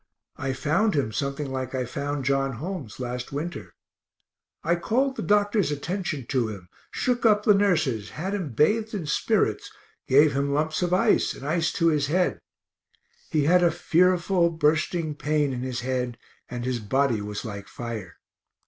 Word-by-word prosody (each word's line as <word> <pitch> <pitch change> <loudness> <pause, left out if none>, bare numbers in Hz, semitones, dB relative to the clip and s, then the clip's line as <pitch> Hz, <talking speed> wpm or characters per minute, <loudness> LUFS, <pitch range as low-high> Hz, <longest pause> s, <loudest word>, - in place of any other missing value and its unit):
I 135 0 -2
found 155 +10 +1
him 135 -7 0
something 140 +5 -3
like 130 0 -3
I 130 -1 -1
found 140 +2 -3
John 135 0 +1
Holmes 145 - -6
last 125 0 -4
winter. 155 +5 -5 0.9
I 170 +2 +2
called 260 +10 0
the - - -4
doctor's 205 -2 +2
attention 150 - -3
to 125 -4 +1
him, 95 -5 -8 0.2
shook 250 -1 -1
up 210 -2 +4
the 210 - +6
nurses, 160 - +1
had 190 +6 -4
him 180 -11 -3
bathed 215 - +2
in 185 -6 -3
spirits, 150 - 0 0.4
gave 145 +2 +5
him 140 +1 0
lumps 155 +2 0
of 175 -1 0
ice, 180 - +3
and 135 - -9
ice 160 +2 +1
to 165 -1 +3
his 150 -3 +1
head; 180 +4 +1 0.9
he 155 -3 +1
had 180 +5 +5
a 175 - +5
fearful 175 +1 +2
bursting 160 0 +1
pain 150 -1 0
in 125 - -4
his 125 -1 -3
head, 125 -1 -2 0.3
and 120 -1 -5
his 125 -1 -1
body 120 +1 +1
was 105 +2 -5
like 100 -3 -6
fire. 115 -7 -7
145 Hz, 165 wpm, -25 LUFS, 130-175 Hz, 0.9 s, the